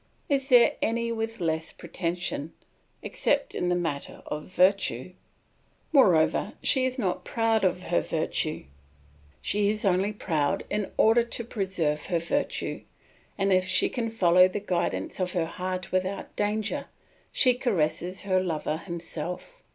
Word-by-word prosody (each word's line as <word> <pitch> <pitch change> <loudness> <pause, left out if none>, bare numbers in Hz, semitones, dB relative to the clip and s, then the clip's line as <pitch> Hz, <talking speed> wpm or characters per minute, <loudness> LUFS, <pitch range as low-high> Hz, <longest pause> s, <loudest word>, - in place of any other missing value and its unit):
Is 275 -1 +1
there 245 -2 +6
any 230 +1 0
with 225 -1 -3
less 160 -2 -1
pretension, 170 -2 -4 0.5
except 285 -1 0
in 180 - -1
the 180 - +2
matter 165 -5 -4
of 150 0 -5
virtue? 185 -5 +1 0.8
Moreover, 185 - +4
she 260 -2 +3
is 255 +1 -4
not 190 -8 -1
proud 225 -2 +1
of 180 -1 +1
her 175 - +1
virtue, 155 -1 -2 0.8
she 205 0 +1
is 210 0 -2
only 190 +2 +2
proud 160 -8 -1
in 210 -2 -1
order 225 +2 +5
to 235 0 -3
preserve 185 -9 -2
her 175 - +1
virtue, 225 - -2 0.6
and 195 0 +2
if 185 0 +3
she 190 - +3
can 235 -3 -2
follow 180 -4 +5
the 185 +2 -4
guidance 175 - -2
of 180 -1 -1
her 170 -3 +1
heart 185 +2 -4
without 185 +1 -2
danger, 210 +1 -1 0.4
she 255 -2 +4
caresses 185 - -1
her 185 -2 +2
lover 160 -3 -2
himself. 170 - -6
185 Hz, 145 wpm, -27 LUFS, 170-225 Hz, 0.8 s, there